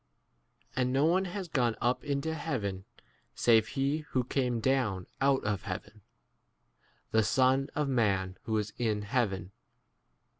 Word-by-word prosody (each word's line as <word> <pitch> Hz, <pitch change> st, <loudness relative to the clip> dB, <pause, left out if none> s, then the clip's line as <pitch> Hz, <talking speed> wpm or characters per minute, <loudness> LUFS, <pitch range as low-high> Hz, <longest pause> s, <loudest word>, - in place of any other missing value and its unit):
And 125 Hz, 0 st, +1 dB
no 135 Hz, +3 st, +3 dB
one 185 Hz, +4 st, +3 dB
has 185 Hz, 0 st, -5 dB
gone 125 Hz, -7 st, +1 dB
up 120 Hz, +2 st, 0 dB
into 145 Hz, +2 st, -1 dB
heaven 105 Hz, -12 st, -3 dB, 0.5 s
save 115 Hz, -2 st, +4 dB
he 140 Hz, +3 st, 0 dB
who 135 Hz, -4 st, -1 dB
came 125 Hz, -1 st, 0 dB
down 115 Hz, -7 st, +1 dB, 0.2 s
out 135 Hz, -1 st, +3 dB
of 105 Hz, -2 st, -1 dB
heaven, -, -, -7 dB, 1.1 s
the 110 Hz, -, +4 dB
Son 130 Hz, +5 st, +3 dB
14 150 Hz, -, +1 dB
of -, -, -2 dB
man 100 Hz, -7 st, +1 dB
who 110 Hz, -1 st, 0 dB
is 105 Hz, 0 st, -2 dB
in 110 Hz, -3 st, 0 dB
heaven. 100 Hz, -5 st, -1 dB
125 Hz, 145 wpm, -30 LUFS, 105-140 Hz, 1.1 s, save